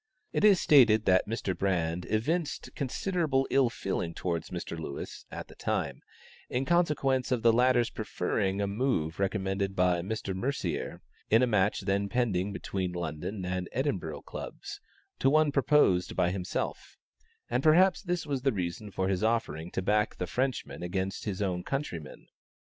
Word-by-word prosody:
It - - 0
is 205 -4 +7
stated 115 -7 +6
that 95 0 +4
Mr. 105 -4 -2
Brand 85 -2 -1
evinced 150 +9 -1
considerable 145 0 0
ill 135 -3 +4
feeling 90 -6 -3
towards 85 -3 -2
Mr. 85 -1 -5
Lewis, 80 -4 -7
at - - -7
the - - -14
time, - - -2 0.5
in 125 +2 -1
consequence 145 -7 +2
of 125 -3 +1
the 115 -1 +6
latter's 120 0 +3
preferring 100 -1 -1
a - - +1
move 100 - -1
recommended 95 0 -1
by 90 -2 +2
Mr. 100 +1 -3
Mercier 95 - -3 0.3
in 115 +2 +5
the - - +5
match 105 -4 +2
then 100 +1 0
pending 100 -4 0
between 95 -2 -3
the - - -5
London 85 +4 -4
and 90 0 -3
Edinburgh 95 - -2
clubs, - - -8 0.4
to 135 - +4
one 155 +1 +4
proposed 140 -10 +3
by 90 -1 +2
himself, 90 -1 -4 0.5
and 125 +2 0
perhaps 175 +5 +5
this 180 -4 -2
was 140 -3 -2
the 135 +1 +2
reason 95 0 -4
for 95 -1 -1
his 95 +1 0
offering 90 -8 0
to 95 - -3
back 105 +2 +1
the 90 - -3
Frenchman 130 +5 -2
against 95 +2 -3
his 105 -1 -2
own 90 -2 -1
countryman. 110 - -5
100 Hz, 160 wpm, -29 LUFS, 90-130 Hz, 0.5 s, is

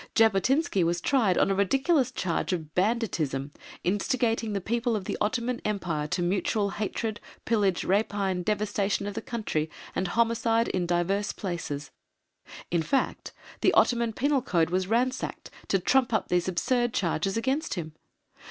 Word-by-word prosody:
Jabotinsky 225 - +3
was 170 +1 +1
tried 210 -4 +2
on - - +3
a - - +3
ridiculous 265 - +2
charge 185 -5 -1
of 155 -4 -4
"banditism, 175 - 0 0.3
instigating 225 +3 0
the 200 - 0
people 235 +4 0
of 200 -3 -3
the - - -2
Ottoman 235 +3 -1
Empire 170 -8 -2
to 185 +2 -1
mutual 200 +3 0
hatred, 215 +1 -3 0.3
pillage, 205 -5 +2
rapine, 195 -2 +1
devastation 205 0 0
of 205 - -4
the - - -4
country, 185 -10 -2 0.3
and 185 - 0
homicide 230 +2 +2
in 180 -2 -1
divers 180 +4 0
places" 170 -6 -4 0.8
in 170 -1 +2
fact 270 - -1 0.3
the - - +4
Ottoman 235 -1 +3
penal 280 +3 +1
code 170 -8 +1
was 185 0 0
ransacked 250 +4 -1 0.2
to 195 - +3
trump 245 +5 +2
up 220 - 0
these 180 0 +1
absurd 240 +7 0
charges 190 +2 0
against 265 +6 -1
him. 160 -4 -5
205 Hz, 150 wpm, -27 LUFS, 180-235 Hz, 0.8 s, the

